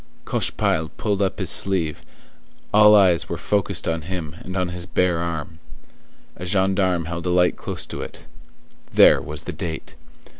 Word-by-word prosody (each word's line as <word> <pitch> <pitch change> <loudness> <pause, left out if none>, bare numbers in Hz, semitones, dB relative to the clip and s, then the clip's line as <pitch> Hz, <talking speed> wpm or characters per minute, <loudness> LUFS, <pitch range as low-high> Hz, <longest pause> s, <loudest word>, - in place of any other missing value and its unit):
Cochepaille 80 0 0
pushed 105 -2 -1
up 95 - 0
his 95 -4 0
sleeve; 85 -6 +1 0.7
all 105 0 +7
eyes 95 -5 +4
were - - -3
focused 100 -3 -1
on 80 0 -1
him 85 -2 -6
and 95 +1 -6
on 90 -1 0
his 90 0 -5
bare 90 -2 +1
arm. 85 -1 -4 0.8
A 90 - -7
gendarme 95 -2 +1
held 85 +2 -4
a - - 0
light 90 0 +3
close - - -5
to - - -7
it; - - -9 0.7
there - - +6
was 75 0 -6
the 90 - -5
date. 80 -1 -6
90 Hz, 160 wpm, -22 LUFS, 85-95 Hz, 0.8 s, all